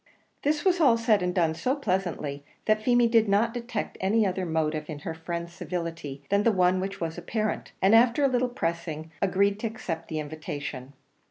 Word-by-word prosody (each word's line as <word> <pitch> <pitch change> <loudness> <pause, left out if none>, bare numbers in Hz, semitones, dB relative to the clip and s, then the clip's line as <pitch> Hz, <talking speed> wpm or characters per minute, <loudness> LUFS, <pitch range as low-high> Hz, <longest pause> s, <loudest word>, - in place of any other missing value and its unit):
This 295 +3 0
was 360 -2 +3
all 250 -7 +6
said 225 -3 +3
and 180 0 0
done 170 -3 +2
so 255 - 0
pleasantly, 180 - -2 0.2
that 215 0 +2
Feemy 240 +1 +4
did 225 -2 +3
not 220 +4 +3
detect 235 -3 -4
any 210 +3 +3
other 185 -1 -1
motive 155 -1 -1
in 155 - -4
her 165 - -2
friend's 170 +1 -5
civility 165 -6 -5
than 200 +1 +3
the 230 - +4
one 185 -2 +3
which 195 +1 -4
was 165 0 -3
apparent, 215 +4 -2
and 195 +3 +5
after 235 +4 +5
a - - +6
little 250 -1 +1
pressing, 165 -6 -3
agreed 200 +1 +2
to 225 - -1
accept 170 -8 -5
the 155 - -4
invitation. 145 -3 -6
190 Hz, 190 wpm, -27 LUFS, 165-230 Hz, 0.2 s, all